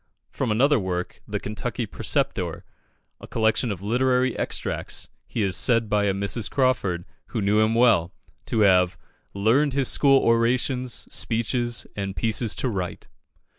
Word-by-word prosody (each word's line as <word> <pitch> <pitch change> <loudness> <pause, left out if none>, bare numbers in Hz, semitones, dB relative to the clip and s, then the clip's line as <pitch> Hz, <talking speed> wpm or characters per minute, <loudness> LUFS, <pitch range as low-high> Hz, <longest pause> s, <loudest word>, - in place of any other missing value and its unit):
From 130 - -2
another 135 +5 +3
work, 90 -2 -4
"The - - -3
Kentucky 120 +3 -4
Preceptor," 100 - -2 0.6
a - - -11
collection 110 +1 +1
of 95 -1 -6
literary 125 +3 +1
extracts, - - -2 0.2
he 110 - -2
is 95 -2 +1
said 115 -1 +2
by 105 -1 +2
a 100 - +2
Mrs. 100 +2 -1
Crawford, 120 -10 0 0.2
who 115 - -4
knew 105 +1 +2
him 110 +1 +2
well, 110 -8 +4 0.4
to 110 - 0
have 90 -3 +4 0.4
"learned 125 +8 +2
his 135 -2 +2
school 135 -1 +5
orations, 125 +2 +1 0.2
speeches, 120 +1 -1
and 100 -1 -4
pieces 110 0 0
to - - -1
write." 95 -7 -4
115 Hz, 145 wpm, -24 LUFS, 100-125 Hz, 0.6 s, school